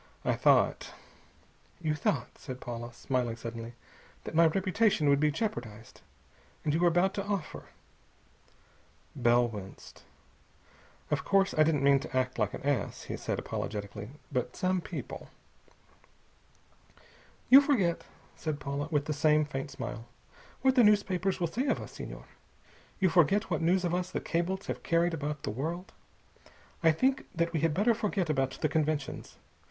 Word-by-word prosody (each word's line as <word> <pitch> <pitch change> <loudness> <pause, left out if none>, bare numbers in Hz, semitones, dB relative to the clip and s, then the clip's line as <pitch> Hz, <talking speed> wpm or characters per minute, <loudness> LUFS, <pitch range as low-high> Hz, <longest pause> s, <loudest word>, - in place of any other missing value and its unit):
I - - +2
thought - - +2 0.4
" - - -33
"You 155 - +3
thought," 140 -4 -1
said 130 -1 -7
Paula, 120 -1 -6
smiling 120 -1 -2
suddenly, 115 0 -7 0.5
"that - - -7
my 165 +1 +6
reputation 190 -1 +2
would 140 0 +4
be 150 +1 +3
jeopardized. 120 - -5 0.6
And 150 - +1
you 160 - +1
were 175 - +4
about 175 +3 +3
to 200 - -2
offer 200 -5 -4 0.8
" - - -33
Bell 120 +1 +5
winced. 100 -4 -10 1.1
"Of - - 0
course 195 -1 +3
I 155 - +3
don't 155 -3 +3
mean 140 0 +5
to 135 -2 -4
act 130 -1 -1
like 105 -2 0
an - - -9
ass," 140 -7 -1
he - - -5
said - - -3
apologetically, 105 0 -5 0.2
"but 125 -2 -2
some 185 0 0
people...." - - -7 2.2
"You 270 +2 +10
forget," 215 - +1 0.3
said 155 -2 -3
Paula, 140 +1 -3
with 145 -3 0
the 155 - -1
same 150 +1 +3
faint 135 -1 -5
smile, 120 -3 -6 0.6
"what 265 0 +5
the 250 -2 +5
newspapers 195 -3 +2
will 175 - +1
say 240 - -2
of - - +1
us, - - -8
Senhor. - - -8 0.7
You 190 -2 +4
forget 175 +4 +3
what - - 0
news 180 +3 +2
of 175 - 0
us 180 0 -1
the - - -2
cables 185 +3 -2
have - - -4
carried 170 +1 +2
about 150 -2 -4
the - - -2
world. 165 - -4 0.9
I 165 - +6
think 260 - +1
that 170 0 0
we 160 - +1
had 155 0 +1
better 215 +6 +3
forget 200 -6 -1
about 135 -2 -1
the - - +3
conventions. 155 -2 -2
155 Hz, 160 wpm, -30 LUFS, 135-185 Hz, 2.2 s, You